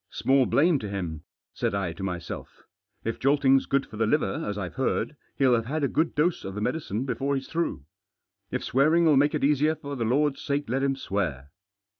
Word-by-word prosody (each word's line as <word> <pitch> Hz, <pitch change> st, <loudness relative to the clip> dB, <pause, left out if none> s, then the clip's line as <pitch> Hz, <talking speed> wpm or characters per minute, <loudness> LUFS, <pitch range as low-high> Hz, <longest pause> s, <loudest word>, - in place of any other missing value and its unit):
"Small 135 Hz, -1 st, +2 dB
blame 155 Hz, 0 st, +3 dB
to 105 Hz, -, -5 dB
him," 85 Hz, -6 st, -4 dB, 0.3 s
said -, -, -1 dB
I 95 Hz, -4 st, -1 dB
to 95 Hz, -, -10 dB
myself. 90 Hz, -3 st, -6 dB, 0.4 s
"If 115 Hz, -, -3 dB
jolting's 135 Hz, -1 st, +3 dB
good 140 Hz, 0 st, +1 dB
for 105 Hz, -, -11 dB
the 110 Hz, 0 st, +1 dB
liver, 110 Hz, -6 st, 0 dB
as 105 Hz, -, -3 dB
IVe 95 Hz, -3 st, -4 dB
heard, 135 Hz, +3 st, -1 dB, 0.2 s
he'll 130 Hz, -2 st, +4 dB
have 115 Hz, -1 st, +1 dB
had 155 Hz, +3 st, -2 dB
a -, -, +3 dB
good 160 Hz, +4 st, 0 dB
dose 165 Hz, +4 st, +1 dB
of 95 Hz, 0 st, -6 dB
the -, -, -3 dB
medicine 125 Hz, -2 st, -2 dB
before 140 Hz, +1 st, -1 dB
he's 135 Hz, -1 st, -4 dB
through. 165 Hz, -, -2 dB, 0.6 s
If -, -, -3 dB
swearing 155 Hz, +6 st, +3 dB
'11 150 Hz, -4 st, +5 dB
make 145 Hz, +1 st, +2 dB
it -, -, -2 dB
easier, 150 Hz, +2 st, +3 dB
for 140 Hz, -2 st, -7 dB
the 120 Hz, -, -2 dB
Lord's 135 Hz, +5 st, +1 dB
sake 145 Hz, +1 st, -1 dB
let 130 Hz, +3 st, 0 dB
him 135 Hz, 0 st, +1 dB
swear." 80 Hz, -, -3 dB
135 Hz, 210 wpm, -26 LUFS, 100-145 Hz, 0.6 s, 11